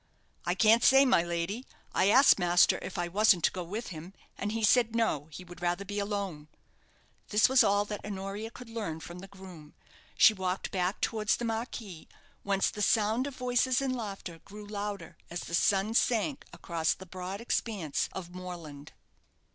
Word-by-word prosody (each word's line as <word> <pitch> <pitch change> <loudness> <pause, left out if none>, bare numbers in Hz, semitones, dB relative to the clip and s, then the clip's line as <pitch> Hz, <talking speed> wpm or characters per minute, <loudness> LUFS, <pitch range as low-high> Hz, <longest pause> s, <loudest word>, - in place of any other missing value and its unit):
"I - - +1
can't 225 +1 +5
say, 270 +1 +7
my 255 -10 +4
lady. 170 +7 -3 0.3
I 190 - +3
asked 265 0 +6
master 175 0 +4
if - - -7
I 175 0 -1
wasn't 195 -1 +3
to - - +4
go 180 - -5
with 210 +7 -5
him, 175 +2 -9 0.2
and 205 - -3
he 225 0 -3
said, 230 +1 +4
'No, 185 -11 0
he 160 +4 -9
would 175 0 -13
rather 175 +3 -1
be 205 +1 -4
alone.'" 200 -7 -3 0.8
This 210 +1 +4
was 260 -1 +5
all 205 +1 +2
that 210 -1 -6
Honoria 200 +2 -5
could 245 +1 -12
learn 205 -9 -4
from 170 +3 -9
the 195 - -10
groom. 185 -6 -13 0.4
She 220 - +7
walked 185 -1 -3
back 185 +1 -1
towards 215 -1 +1
the 240 - -4
marquee, 225 -6 -5 0.3
whence 195 -1 +1
the 210 - -6
sound 220 +5 +2
of 280 - -7
voices 250 0 +1
and 265 -2 -1
laughter 195 -7 -6
grew 210 +1 -11
louder 205 -5 -5
as 175 +1 -5
the - - -8
sun 195 +4 +2
sank 240 +3 +1
across 165 -3 -1
the 190 - -11
broad 185 +2 -6
expanse 210 - -2
of 180 -2 -8
moorland. 170 -6 -9
200 Hz, 180 wpm, -30 LUFS, 175-225 Hz, 0.8 s, say